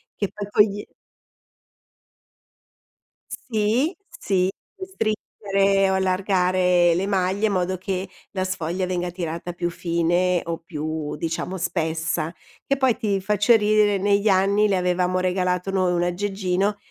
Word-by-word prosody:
che 200 - -2
poi 205 -1 -6
togli 205 0 +2 2.5
Sì, 235 - 0
sì. 190 - 0 0.3
Puoi 375 -1 -7
stringere 200 - 0
o - - +1
allargare 185 -2 +2
le 190 +3 -1
maglie 195 +2 +1
in - - -1
modo 185 0 0
che 185 0 -4 0.2
la 190 -2 -2
sfoglia 185 0 -2
venga 180 -1 -2
tirata 170 0 -5
più 175 0 -2
fine 175 +1 +1
o 170 0 -3
più 155 -2 -5
diciamo 165 +4 -3
spessa. 165 0 -2 0.3
Che 275 - +1
poi 260 -4 +2
ti 205 -4 0
faccio 210 +4 +3
ridere, 210 -1 +3
negli 200 +2 +2
anni 200 +2 +3
le 195 -2 +1
avevamo 180 0 +1
regalato 180 0 0
noi 185 -2 +1
un 175 0 +1
aggeggino 195 +2 -1
185 Hz, 130 wpm, -23 LUFS, 180-205 Hz, 2.5 s, faccio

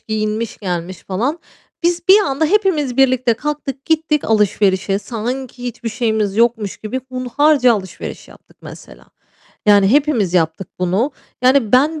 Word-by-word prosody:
giyinmiş 215 +1 -3
gelmiş 180 -2 -4
falan. 245 - -2 0.5
Biz 345 0 +1
bir 390 +2 +8
anda 280 -2 0
hepimiz 325 - +1
birlikte 255 -3 +3
kalktık 275 0 -5
gittik 315 -2 +1
alışverişe. 200 -2 +1
Sanki 245 +3 -5
hiçbir 240 -1 -5
şeyimiz 220 -3 -1
yokmuş 225 -3 +1
gibi 220 +5 -5
hunharca 255 +1 +2
alışveriş 190 -3 -7
yaptık - - -19
mesela. - - -12 0.6
Yani 200 -2 +5
hepimiz 260 - +2
yaptık 165 +2 0
bunu. 190 +10 +1 0.3
Yani 255 -4 +3
ben 300 +5 +3
240 Hz, 130 wpm, -18 LUFS, 210-280 Hz, 0.6 s, bir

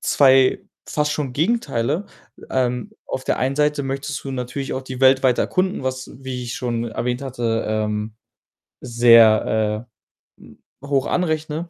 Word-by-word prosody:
2 130 -2 +4 0.3
fast 150 0 -1
schon 140 -4 -3
Gegenteile. 165 - 0 0.5
Ähm, 125 +9 -1 0.2
auf 130 - -4
der - - 0
einen 135 +2 -1
Seite 150 -1 +1
möchtest 135 +1 -4
du 135 - -5
natürlich 130 +1 -4
auch 130 - -4
die 130 -1 -8
Welt 130 0 +5
weiter 125 -2 +3
erkunden, 185 -3 -1
was, 130 0 -4
wie 130 -1 -5
ich 120 - -5
schon 120 -2 -2
erwähnt 120 +3 -3
hatte, 120 -4 -2
ähm, 105 0 -2 0.7
sehr, 115 -2 +4 0.5
äh, - - -16
hm, - - -17 0.3
hoch 140 -1 0
anrechne, 160 -1 -2
130 Hz, 150 wpm, -21 LUFS, 120-145 Hz, 0.7 s, Welt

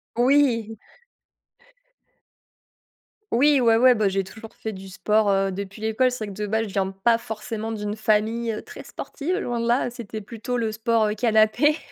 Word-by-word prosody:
Oui! 240 -4 +2 2.5
Oui, 280 +2 +4
ouais, 230 -1 +4
ouais. 255 +2 +6
Ben, 215 -4 +1
j'ai 195 0 0
toujours 220 +4 -12
fait 220 -1 -5
du 190 0 -10
sport, 210 +2 +1
heu, 195 0 +2
depuis 195 +2 -7
l'école. 220 +4 +2
C'est 250 -3 -4
vrai 205 - -8
que, 205 - -8
de 210 - -1
base, 220 +2 0
je 205 -3 -7
viens 190 -1 0
pas 210 +5 +1
forcément 225 -1 -5
d'une 210 -1 -3
famille 215 +1 0
très - - -10
sportive, 350 +6 -4
loin 240 - -2
de 235 - -1
là. 240 +1 +1
C'était 225 -3 -7
plutôt 230 +3 -5
le 225 -2 -1
sport 220 0 +1
canapé. 225 +6 +3
220 Hz, 170 wpm, -24 LUFS, 210-240 Hz, 2.5 s, ouais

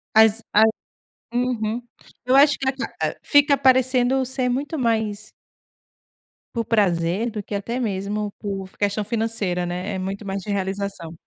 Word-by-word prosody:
As 220 0 +6
A 215 - +6 0.7
Uhum, 240 -1 -1 0.4
eu 250 +1 +2
acho 285 +1 +6
que 270 - -4
a 265 - +3
ca 265 - -6
ah, - - 0
fica 290 0 +5
parecendo 260 0 +3
ser 255 0 -1
muito 285 +6 -2
mais 220 -4 -1 1.2
por 230 -1 -1
prazer 195 0 +1
do 210 -1 -4
que 205 - -6
até 230 +5 -3
mesmo 205 -1 -2
por 195 -2 -5
f - - -23
questão 205 +1 0
financeira, 215 -5 -1
né, 180 +4 -3
é - - -2
muito 195 +3 -5
mais 195 0 -3
de 195 - -9
realização. 195 -3 -3
215 Hz, 160 wpm, -23 LUFS, 200-250 Hz, 1.2 s, As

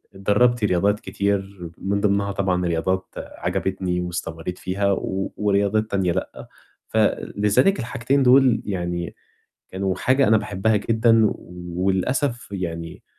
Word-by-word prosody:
آآ - - -11
اتدرّبت 115 +4 +2
رياضات 100 +2 +2
كتير 100 -3 -3
من 100 +1 -1
ضِمنها 100 -1 +1
طبعًا 90 -2 0
رياضات 95 +3 0
عجبتني 95 -2 -3
واستمرّيت 85 0 -5
فيها 100 +2 -1
و 95 0 -2
ورياضات 105 +1 +1
تانية 95 -3 +1
لأ. - - -5 0.4
فلذلك 105 - +2
الحاجتين 130 +3 0
دُول 130 -1 +5
يعني 85 -3 -3 0.5
كانوا 95 -1 -2
حاجة 130 +4 +2
أنا 110 0 +5
باحبّها 105 +1 0
جدًا، 115 +1 +3
وللأسف 95 +9 -2
يعني 85 -3 -5
100 Hz, 120 wpm, -22 LUFS, 90-110 Hz, 0.5 s, دُول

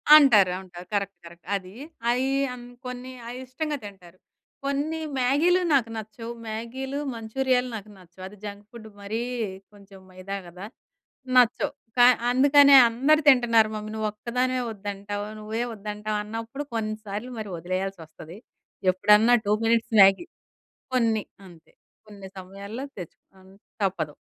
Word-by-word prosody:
అంటారు. 225 -11 +7
అంటారు. 180 -1 -11
Correct. 200 -2 -2
Correct. 170 0 -14
అది. 185 -1 -6 0.4
అయి 255 +2 0 0.2
అన్ 245 -1 -10 0.2
కొన్ని 250 +1 -6 0.2
అయి 245 +1 -6
ఇష్టంగా 295 +3 -3
తింటారు. 185 -3 -13 0.5
కొన్ని 290 +3 -1 0.2
మ్యాగీలు 300 +9 +3
నాకు 250 -5 +3
నచ్చవు. 220 +2 -7 0.2
మ్యాగీలు, 255 +5 -5
మంచూరియాలు 250 +3 0
నాకు 210 -1 -8
నచ్చవు. 185 0 -15
అది 210 +2 -14
జంక్ 205 0 -8
ఫుడ్ 230 -2 -11
మరీ 200 +3 -4 0.5
కొంచెం 200 -1 -16
మైదా 185 +2 -7
గదా! 180 +3 -10 0.7
నచ్చవు. 245 -1 +4 0.3
కా 245 - +8 0.3
అందుకనే 280 +2 +7
"అందరూ 275 +7 +3
తింటున్నారు 235 -5 +5
మమ్మీ, 215 0 -6
నువ్వొక్కదానివే 235 +4 -1
వద్దంటావు. 205 0 -5
నువ్వే 220 +2 -3
వద్దంటావు" 210 0 -4
అన్నప్పుడు 225 +6 -6
కొన్నిసార్లు 215 +1 -4
మరి 210 -3 -6
ఒదిలేయాల్సొస్తది. 175 -1 -6 0.5
ఎప్పుడన్నా 210 +5 +5
2 205 - +3
మినిట్స్ 230 0 +1
మ్యాగీ. 195 - +6 0.7
కొన్ని 225 -3 +2 0.2
అంతే. 170 -3 -18 0.3
కొన్ని 200 -2 -11
సమయాల్లో 200 +6 -8
తెచ్చుకున్ 190 +1 -12 0.3
తప్పదు. 165 -6 -1
215 Hz, 125 wpm, -25 LUFS, 195-250 Hz, 0.7 s, కా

